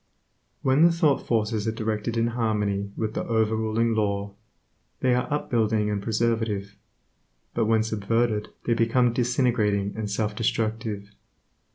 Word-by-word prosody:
When 135 +3 +3
the 170 +1 +7
thought 160 -4 +1
forces 110 -1 0
are - - +2
directed 110 +1 -2
in 115 +1 +2
harmony 105 -4 -1
with 110 -1 -2
the - - -2
over 110 -1 +2
ruling 110 +1 +1
Law, 100 -2 -1 0.7
they 130 -1 +3
are 125 +4 -1
up 145 - -2
building 110 -2 +2
and 100 -1 -1
preservative, 110 -2 -1 0.8
but 115 - +1
when 110 0 +3
subverted 110 0 0 0.2
they 120 - +2
become 115 +1 +2
disintegrating 120 -5 +1
and 110 -1 -3
self 105 +1 -1
destructive. 110 -2 -2
110 Hz, 145 wpm, -25 LUFS, 105-115 Hz, 0.8 s, the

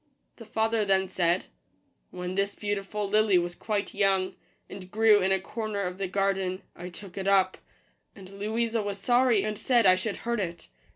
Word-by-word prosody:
The 230 - -12
father 220 0 +1
then 190 -1 +2
said, 175 -1 +1 0.3
" - - -41 0.3
When 180 0 -5
this 200 +1 -1
beautiful 205 0 -3
lily 210 -1 +4
was 175 0 -1
quite 205 +1 -3
young, 195 -2 +1 0.3
and 190 -1 -10
grew 215 0 +5
in 190 +1 +1
a 190 - +3
corner 215 +1 -4
of 180 +1 -4
the 195 - -1
garden, 195 0 -1
I 175 +1 -7
took 190 +1 -9
it 190 - -3
up; 190 -1 +3 0.6
and 195 -2 -12
Louisa 220 +4 -1
was 205 -1 -4
sorry, 240 0 +3
and 215 -1 -3
said 240 -4 +3
I 185 -1 +7
should 195 +3 -3
hurt 235 -1 0
it. 170 -3 -5
195 Hz, 185 wpm, -28 LUFS, 185-215 Hz, 0.6 s, I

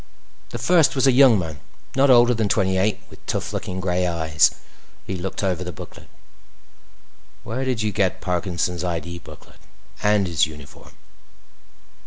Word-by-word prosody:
The - - -6
First 145 +2 +3
was 130 - +2
a 135 - +6
young 130 -3 +6
man, 80 -5 -5 0.4
not 135 +1 +4
older 120 -1 +6
than 110 -3 -1
twenty 95 -1 +1
eight 100 +3 0
with - - -16
tough - - -3
looking 95 0 -4
gray 90 -1 0
eyes. 80 -2 +3 0.6
He 95 - -4
looked 95 +3 -5
over 90 -2 -1
the 90 - -5
booklet. 75 - -12 1.4
"Where 125 +4 -4
did 125 -4 -1
you 105 - 0
get 95 -3 0
Parkinson's 90 -1 -2
ID 85 0 -4
booklet? 80 -3 -15 0.4
And 105 -1 +2
his 85 -5 +1
uniform?" 75 -2 -13
95 Hz, 155 wpm, -22 LUFS, 85-115 Hz, 1.4 s, a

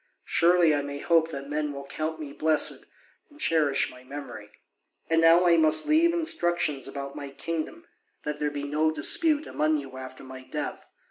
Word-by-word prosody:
Surely 170 -2 +4
I 145 - +1
may 140 0 -6
hope 165 +2 +2
that 140 -3 -7
men 150 0 -2
will 140 0 -8
count 155 +3 -4
me 145 -2 -7
blessed 155 +1 +1 0.4
and 295 0 -19
cherish 155 - +1
my 125 0 -14
memory. 130 -6 -9 0.6
And 165 0 +4
now 165 +2 +6
I 170 -1 +5
must 155 -1 +4
leave 320 +2 +4
instructions 175 - 0
about 140 0 -7
my 140 -1 -7
kingdom, 165 - -5 0.4
that 150 0 -4
there 150 - 0
may 145 -1 -5
be - - -4
no 155 +2 +1
dispute 305 - +3
among 155 +1 0
you 135 -2 -8
after 130 0 -9
my 130 0 -10
death. 150 +3 -6
155 Hz, 185 wpm, -26 LUFS, 140-165 Hz, 0.6 s, now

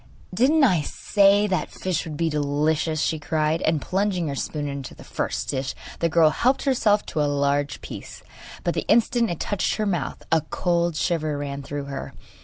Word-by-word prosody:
'Didn't 275 +10 +4
I 185 - +4
say 200 +6 +3
that 190 -3 -1
fish 180 -3 -2
would 155 -2 -6
be 165 - +1
delicious?' 150 +1 0
she 160 - 0
cried; 155 +1 0
and 160 -1 +2
plunging 185 0 -1
her 140 - -3
spoon 145 +1 -3
into 140 -2 -6
the - - -13 0.4
dish 130 -1 -2 0.2
the 170 - +1
girl 160 -1 +5
helped 255 - +1
herself 215 -6 +2
to 155 - -2
a 145 - +2
large 140 0 0
piece. - - -9 0.4
But - - 0
the - - -3
instant 235 0 +3
it 170 - -3
touched 205 -3 0
her 215 - -1
mouth 175 -8 -2
a 165 -1 +4
cold 170 +1 0
shiver 155 -2 0
ran 140 -1 -4
through 145 +1 -5
her. 140 -1 -6
160 Hz, 185 wpm, -24 LUFS, 145-195 Hz, 0.4 s, girl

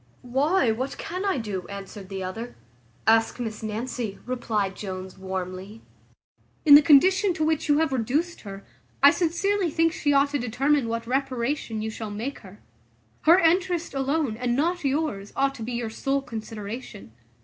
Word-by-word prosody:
"Why, 265 +2 +2
what 255 +5 -3
can 365 +2 -4
I 390 -7 +1
do?" 205 -6 -4
answered 200 0 -9
the 190 -1 -4
other. 225 +6 -6 0.5
"Ask 225 +2 +3
Miss 225 -2 -4
Nancy," 220 0 -4
replied 215 -6 -2
Jones 185 -2 -6
warmly. 190 +3 -6 0.8
"In 295 - +8
the 290 - +11
condition 360 +6 +5
to 315 - -1
which 315 -1 0
you 290 - +5
have 315 -3 +1
reduced 280 +9 -1
her, 195 -1 -9 0.4
I 280 - +10
sincerely 365 +3 0
think 330 +1 +2
she 290 - 0
ought 280 0 +3
to 290 - 0
determine 260 +3 +1
what 230 0 -3
reparation 255 -3 -2
you 220 - -3
shall 220 -1 -6
make 225 +7 -5
her. 195 0 -15 0.6
Her 335 +3 +8
interest 350 -1 +1
alone, 270 -3 0
and 245 0 0
not 340 +6 0
yours, 270 -8 -1
ought 275 0 +1
to 240 - -11
be 240 +3 -4
your 235 -2 -3
sole 275 +4 -1
consideration. 220 - -7
250 Hz, 165 wpm, -25 LUFS, 215-295 Hz, 0.8 s, the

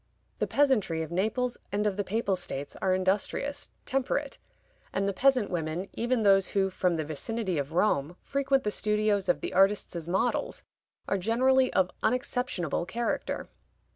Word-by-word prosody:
The - - 0
peasantry 215 - +2
of 160 - -8
Naples 220 +7 -1
and 205 +1 0
of 205 -2 +1
the 205 - -1
Papal 200 0 0
States 140 -5 -4
are 190 - +2
industrious, 205 +10 -1 0.2
temperate; 270 +1 -1 0.5
and 195 0 0
the 200 - 0
peasant 255 -2 +3
women, 170 +2 -3
even 240 0 0
those 195 -1 +5
who, 195 -1 +2
from 180 -1 +1
the 155 -2 -2
vicinity 185 +4 -2
of 140 +2 -4
Rome, 170 -4 +1
frequent 275 -1 +1
the 210 - 0
studios 210 -2 +1
of 175 - +2
the - - -4
artists 195 +1 +3
as 170 -1 -4
models, 240 - -1 0.4
are 195 - 0
generally 255 +6 +3
of 185 -1 +2
unexceptionable 250 - -1
character. 235 +3 -2
200 Hz, 160 wpm, -28 LUFS, 180-250 Hz, 0.5 s, those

